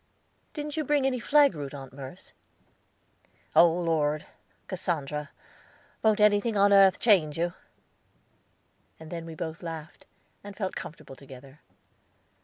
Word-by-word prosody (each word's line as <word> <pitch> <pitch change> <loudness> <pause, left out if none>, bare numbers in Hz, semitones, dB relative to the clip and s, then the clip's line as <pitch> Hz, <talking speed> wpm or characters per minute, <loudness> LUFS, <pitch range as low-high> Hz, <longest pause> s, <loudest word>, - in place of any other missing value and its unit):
"Didn't 300 0 -5
you 310 - 0
bring 290 -1 +1
any 260 -2 0
flag 285 0 +4
root, 145 -2 -6
Aunt 135 -2 -10
Merce?" 135 +5 -9 1.2
"Oh 170 0 +7
Lord, 160 -3 0 0.4
Cassandra, 150 -5 -3 0.7
won't 215 -1 +3
anything 210 +1 +3
upon 200 0 +4
earth 195 -1 +6
change 170 -10 +3
you?" 170 +1 -1 1.5
And 160 -1 -11
then 165 -1 -6
we 165 - -8
both 160 -1 -6
laughed, 165 -2 -8 0.4
and 200 -1 -10
felt 190 -3 -3
comfortable 150 -3 -9
together. 135 +1 -14
170 Hz, 125 wpm, -27 LUFS, 150-205 Hz, 1.5 s, Oh